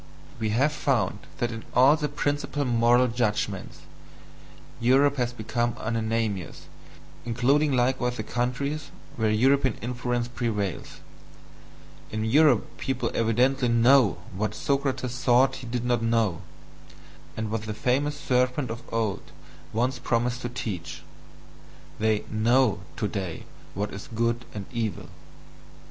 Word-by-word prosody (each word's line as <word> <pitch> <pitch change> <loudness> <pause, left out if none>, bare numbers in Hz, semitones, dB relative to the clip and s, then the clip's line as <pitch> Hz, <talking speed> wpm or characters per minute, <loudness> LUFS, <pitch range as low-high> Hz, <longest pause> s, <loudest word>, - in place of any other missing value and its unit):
We 110 -1 -1
have 135 +8 +2
found - - 0 0.2
that 120 0 -1
in 115 -1 -6
all 130 +4 +7
the 150 -2 -2
principal 145 0 -1
moral 120 +1 +4
judgments, 105 -5 -2 1.0
Europe 135 +4 +4
has 120 -2 0
become 120 +1 -2
unanimous, 115 -5 -2 0.6
including 135 +5 +2
likewise 125 0 +1
the 110 - -3
countries 140 +6 -2 0.3
where 110 -2 +1
European 130 +3 +3
influence 120 0 -2
prevails 110 - -3 1.1
in 110 0 -2
Europe 140 0 +3
people 130 -3 -2
evidently 125 +3 +2
KNOW 120 0 +5 0.2
what 105 +2 -2
Socrates 135 -3 -1
thought 125 +2 +4
he 125 - -9
did 120 0 -3
not 120 -1 +1
know, 115 -6 +1 1.0
and 110 -1 -3
what 110 -1 -2
the 105 - -2
famous 145 +5 0
serpent 125 0 +1
of 115 +1 -6
old 110 -3 -1 0.5
once 125 +3 0
promised 120 +1 0
to 120 - -3
teach 105 -9 -5 1.0
they 110 -1 +1
"know" 110 0 +2 0.2
today 100 -5 -3 0.3
what 105 +2 -3
is 100 - -8
good 115 +1 0
and 100 -2 -5
evil. 115 -5 -3
120 Hz, 125 wpm, -26 LUFS, 110-130 Hz, 1.1 s, all